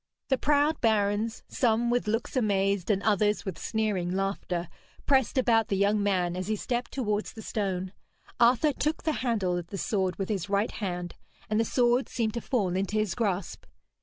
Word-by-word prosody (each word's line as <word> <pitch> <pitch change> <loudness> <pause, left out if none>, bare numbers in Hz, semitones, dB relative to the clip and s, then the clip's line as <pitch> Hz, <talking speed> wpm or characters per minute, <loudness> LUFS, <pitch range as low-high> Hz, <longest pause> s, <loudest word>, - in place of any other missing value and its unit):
The 265 - +3
proud 295 +2 +2
barons, 215 0 +1
some 235 -1 +1
with 245 -3 0
looks 225 +5 -1
amazed 200 -5 +1
and 200 -2 +1
others 210 0 +2
with 190 -4 -5
sneering 210 -5 -1
laughter, 185 -2 -2 0.4
pressed 265 -2 +2
about 230 -4 +3
the 195 - 0
young 205 +1 +2
man 180 -3 +1
as 185 +1 -4
he 215 - 0
stepped 240 +3 -3
towards 210 -5 -2
the 220 - -9
stone. 190 -3 -2 0.5
Arthur 255 +5 +4
took 305 +4 -1
the 315 - +1
handle 205 -8 0
of 170 - -8
the 195 - -6
sword 190 -3 0
with 195 - -4
his 200 -3 -2
right 200 +2 +1
hand, 180 -4 -4 0.4
and 215 - +2
the 225 - +2
sword 245 +2 +2
seemed 225 -3 -1
to 235 - -3
fall 200 -9 0
into 195 +2 -1
his 215 -4 0
grasp. 200 -6 -2
210 Hz, 185 wpm, -28 LUFS, 195-235 Hz, 0.5 s, Arthur